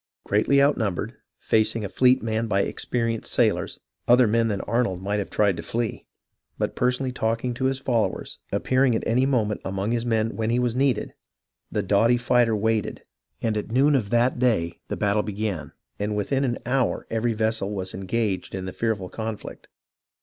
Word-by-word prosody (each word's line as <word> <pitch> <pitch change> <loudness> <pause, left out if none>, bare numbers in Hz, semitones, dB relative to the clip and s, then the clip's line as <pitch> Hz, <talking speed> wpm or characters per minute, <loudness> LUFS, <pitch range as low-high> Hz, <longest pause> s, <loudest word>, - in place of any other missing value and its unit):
Greatly 110 +7 +2
outnumbered, 115 - +1 0.2
facing 110 0 +1
a - - -2
fleet 125 +6 +3
manned 110 0 -1
by 100 -1 +2
experienced 115 +2 -2
sailors, - - +1 0.3
other 125 +1 +6
men 115 +1 +2
than 100 -3 -1
Arnold 115 -5 0
might 100 +2 -1
have 100 - -4
tried 100 -3 +2
to - - -4
flee; 115 +6 -3 0.5
but - - -2
personally 125 +1 0
talking 115 0 -1
to 130 +2 -2
his 135 0 +1
followers, 120 -4 -1
appearing 130 -2 +2
at - - -1
any 125 +3 +2
moment 110 -6 0
among 95 +3 -2
his 120 -1 0
men 115 -1 0
when 110 0 -1
he 120 - +2
was 125 -1 0
needed, 130 -3 +1 0.6
the - - -1
doughty 115 +4 +3
fighter 120 -2 +2
waited, 110 0 -1 0.4
and 110 -2 +1
at 105 +1 -3
noon 140 +5 +4
of 120 -8 +1
that 120 +2 +2
day 95 -10 +1
the - - -4
battle 105 +1 +2
began, 105 -4 -4 0.3
and 105 +1 -1
within 135 +7 0
an 120 -3 0
hour 130 +1 0
every 115 +1 0
vessel 110 -2 -1
was 95 -2 -4
engaged 95 -1 -2
in 95 -1 -4
the 95 - -5
fearful 110 -5 -1
conflict. 110 +1 -6
115 Hz, 180 wpm, -24 LUFS, 105-125 Hz, 0.6 s, other